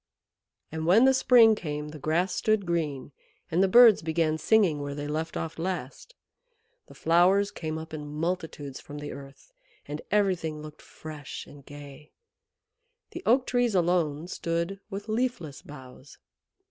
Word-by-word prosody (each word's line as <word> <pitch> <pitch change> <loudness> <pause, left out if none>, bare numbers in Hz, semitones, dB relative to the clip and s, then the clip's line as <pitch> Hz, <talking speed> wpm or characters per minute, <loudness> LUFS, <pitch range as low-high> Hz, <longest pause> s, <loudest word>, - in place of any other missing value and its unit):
And 160 0 -4
when 215 +8 +6
the 265 - +5
spring 240 -4 +6
came 150 -6 -5
the 150 0 -10
grass 170 +6 0
stood 215 -3 +1
green, 155 -6 -2 0.4
and 170 +3 +2
the 195 - +4
birds 225 -3 +7
began 160 -1 0
singing 180 -6 +3
where 145 0 -5
they 145 0 -5
left 155 +2 -3
off 165 0 -5
last. 180 - -5 0.7
The - - -15
flowers 185 +5 +3
came 160 -5 -5
up 160 0 -9
in 150 -1 -6
multitudes 155 -3 -4
from 145 - -10
the 150 0 -6
earth, 140 - -12 0.3
and 150 +1 -5
everything 185 -7 0
looked 155 0 -11
fresh 155 -2 -9
and 145 -1 -15
gay. 145 +1 -12 1.0
The 345 - -7
Oak 255 +3 +4
Trees 245 -4 +1
alone 170 -3 +1
stood 170 +2 -3
with 205 +1 -7
leafless 220 - -2
boughs. 130 -1 -13
165 Hz, 150 wpm, -27 LUFS, 150-195 Hz, 1.0 s, birds